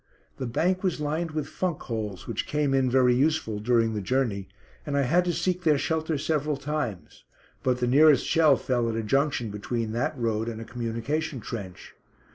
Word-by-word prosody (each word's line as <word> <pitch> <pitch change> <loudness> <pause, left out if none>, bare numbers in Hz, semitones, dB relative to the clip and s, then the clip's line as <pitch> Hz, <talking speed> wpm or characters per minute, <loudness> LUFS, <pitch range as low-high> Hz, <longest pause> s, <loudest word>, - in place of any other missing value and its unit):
The 130 - -3
bank 180 +10 +1
was 185 -5 -1
lined 155 +3 -1
with 155 -2 -3
funk 180 -4 -3
holes, 105 -6 -4
which 115 -2 -3
came 150 -2 0
in 135 -1 +3
very 125 -1 +4
useful 135 -5 +1
during 115 0 +2
the 105 - -2
journey, 105 -3 -1 0.4
and 145 -1 -2
I 140 - +3
had 175 +8 +3
to 175 - +1
seek 180 +1 -1
their 155 -4 +3
shelter 160 +1 -1
several 150 0 -1
times, 135 - -4 0.4
but 125 -1 +1
the 125 - 0
nearest 145 +2 +5
shell 155 -5 +4
fell 120 -2 0
at 110 - -2
a 115 - -2
junction 135 -1 0
between 110 +2 -3
that 120 +5 -1
road 115 -1 -1
and 110 -1 -6
a 115 - -7
communication 120 +5 -3
trench. 100 -6 -7
130 Hz, 190 wpm, -26 LUFS, 115-155 Hz, 0.4 s, nearest